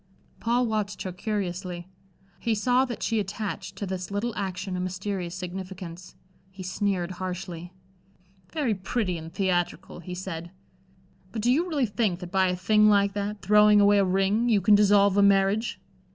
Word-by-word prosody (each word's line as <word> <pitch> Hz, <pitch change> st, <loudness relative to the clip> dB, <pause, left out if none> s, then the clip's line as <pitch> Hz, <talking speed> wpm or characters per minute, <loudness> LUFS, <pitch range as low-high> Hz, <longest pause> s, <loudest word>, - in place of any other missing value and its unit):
Paul 240 Hz, +2 st, +1 dB
watched 215 Hz, -2 st, -2 dB
her 185 Hz, -, -4 dB
curiously. 180 Hz, -2 st, -4 dB, 0.5 s
He 230 Hz, +2 st, 0 dB
saw 250 Hz, +4 st, +2 dB
that 245 Hz, -2 st, -6 dB
she 225 Hz, -1 st, +1 dB
attached 200 Hz, -1 st, -4 dB
to 200 Hz, -, -4 dB
this 185 Hz, -1 st, -4 dB
little 205 Hz, +4 st, -2 dB
action 190 Hz, -2 st, -3 dB
a -, -, -2 dB
mysterious 185 Hz, -1 st, -3 dB
significance. 180 Hz, -1 st, -7 dB, 0.3 s
He 190 Hz, 0 st, -10 dB
sneered 185 Hz, -1 st, -1 dB
harshly. 180 Hz, -1 st, -6 dB, 0.8 s
"Very 285 Hz, -8 st, 0 dB
pretty 190 Hz, -2 st, -2 dB
and 160 Hz, +1 st, -9 dB
theatrical," 180 Hz, -2 st, -1 dB
he 180 Hz, +1 st, -7 dB
said. 175 Hz, -2 st, -6 dB, 0.8 s
"But 220 Hz, 0 st, -4 dB
do 245 Hz, -, +4 dB
you 335 Hz, +7 st, +1 dB
really 290 Hz, -6 st, +1 dB
think 205 Hz, -4 st, -1 dB
that 180 Hz, -1 st, -8 dB
by 190 Hz, -1 st, +3 dB
a 180 Hz, -, 0 dB
thing 210 Hz, +4 st, +4 dB
like 200 Hz, -1 st, +3 dB
that 205 Hz, 0 st, -4 dB
throwing 210 Hz, +1 st, +6 dB
away 205 Hz, 0 st, +5 dB
a -, -, +4 dB
ring 195 Hz, +5 st, +1 dB
you 215 Hz, -3 st, +4 dB
can 200 Hz, +3 st, +4 dB
dissolve 200 Hz, -1 st, +5 dB
a -, -, +6 dB
marriage?" 200 Hz, +2 st, +3 dB
195 Hz, 165 wpm, -26 LUFS, 185-210 Hz, 0.8 s, throwing